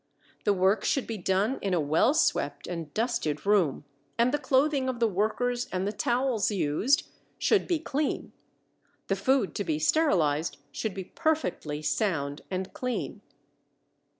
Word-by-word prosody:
The 205 - +4
work 190 +3 +2
should 275 - +1
be 225 -2 -5
done 195 +8 +1
in 195 -2 0
a - - +2
well 155 - +3
swept 145 - +1
and 165 -4 -5
dusted 210 - -1
room, 185 -9 +2 0.3
and 235 +2 +3
the 295 - +2
clothing 275 -1 +2
of 250 -2 -3
the 230 - +4
workers 230 +5 0
and 185 +1 -1
the 205 - 0
towels 240 -1 +1
used 210 - +1 0.3
should 425 - +2
be 345 - +2
clean. 300 -1 -2 0.8
The 195 - +2
food 230 +2 +1
to 205 - -2
be 155 -5 -1
sterilized 160 - +2
should 220 -4 -3
be 190 - -4
perfectly 190 - -2
sound 145 -7 -1
and 185 0 -4
clean. 250 -1 -3
205 Hz, 150 wpm, -28 LUFS, 175-260 Hz, 0.8 s, The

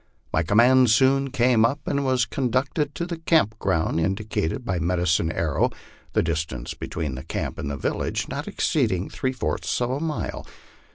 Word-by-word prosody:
My 80 - +3
command 120 +8 +5
soon 135 +4 +4
came 120 -2 +3
up, 135 +6 +2
and 140 0 0
was 130 -3 +2
conducted 135 +5 -1
to 170 - -2
the 170 -2 -5
camp 155 -10 +2
ground 85 -4 0
indicated 95 +4 -1
by 90 -2 -1
Medicine 85 -1 +1
Arrow, - - +1 0.4
the - - +3
distance 80 -6 -3
between 80 -5 -4
the 65 +1 -6
camp - - -4
and 70 - -3
the 70 - -3
village - - -2
not - - -5
exceeding 95 0 0
three 130 - -1
fourths 130 - -2
of 120 0 0
a 135 - -1
mile. 155 -1 -3
115 Hz, 170 wpm, -24 LUFS, 85-130 Hz, 0.4 s, command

